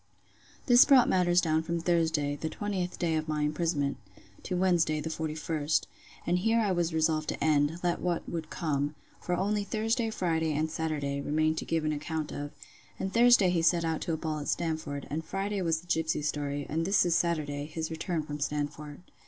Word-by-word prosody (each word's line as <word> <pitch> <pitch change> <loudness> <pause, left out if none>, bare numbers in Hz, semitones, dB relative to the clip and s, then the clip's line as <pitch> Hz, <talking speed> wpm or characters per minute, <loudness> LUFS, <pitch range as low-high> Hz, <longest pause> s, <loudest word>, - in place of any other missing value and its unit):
This 245 -1 +8
brought 270 -4 +6
down - - +1
matters 175 -1 +3
from 160 +1 0
Thursday, 160 -4 +1
the 160 +2 -4
20th 190 -1 -3
day 165 -2 0
of 155 0 -3
my 150 -1 -1
imprisonment, 150 -2 0 0.4
to 180 - -3
Wednesday 175 -4 +2
the 160 +2 -4
41st, 155 -1 -1 0.4
and 175 +1 +1
here 225 +4 +2
I 210 -3 +1
was 175 -2 0
resolved 155 -1 +1
to - - -3
end, 150 +1 +2
let 175 -1 0
what 175 -2 -1
would 160 -2 -4
come; 145 -2 -2 0.3
for 180 - -1
only 205 +3 0
Thursday, 225 +3 0
Friday, 160 -6 0
and 155 +2 -1
Saturday, 145 -3 -2
remain 155 +2 +1
to 160 - -4
give 165 -1 -1
an 155 - +1
account 155 +1 -4
of; 145 0 -5 0.5
and 190 - -3
Thursday 235 -6 +6
he 170 -2 +1
set 165 0 +3
out 160 -1 -1
to 165 - -2
a - - -1
ball 155 -1 -3
at 145 - -6
Stamford; 155 -4 -2
and 160 +2 -2
Friday 195 +3 -2
was 165 -2 0
the - - -20
gipsy 160 -3 0
story; 145 -1 -2
and 160 +2 -1
this 195 +2 +3
is 175 - +2
Saturday, 150 -4 0
his 160 0 -4
return 160 0 -2
from 150 0 -6
Stamford. 145 +1 -4
160 Hz, 195 wpm, -29 LUFS, 150-175 Hz, 0.5 s, This